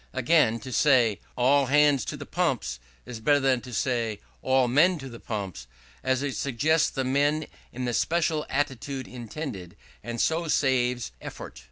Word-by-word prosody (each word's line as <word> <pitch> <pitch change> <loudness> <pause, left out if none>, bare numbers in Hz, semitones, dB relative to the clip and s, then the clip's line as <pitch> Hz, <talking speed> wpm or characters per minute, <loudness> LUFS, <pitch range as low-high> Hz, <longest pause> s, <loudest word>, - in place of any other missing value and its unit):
Again, 150 -9 +3
to 130 - -8
say, 120 - +3 0.2
"All 135 +2 +4
hands 145 0 +4
to - - -5
the - - -8
pumps," - - -1 0.3
is 125 -2 -7
better 145 +6 +3
than 135 -2 +2
to 125 - -10
say, 115 -2 -1 0.2
"All 130 -1 +3
men 165 +9 +4
to 135 -3 -8
the 115 -1 -10
pumps," 100 - -5 0.4
as 130 +1 +1
it 140 -2 -2
suggests 150 +5 +1
the 135 - -3
men 145 +4 +1 0.3
in 125 +1 -4
the 120 - -1
special 160 +2 +1
attitude 135 -1 -2
intended, 115 - -7 0.3
and 120 0 -5
so 165 +5 +1
saves 125 -5 +1
effort. - - -9
130 Hz, 165 wpm, -26 LUFS, 120-145 Hz, 0.4 s, All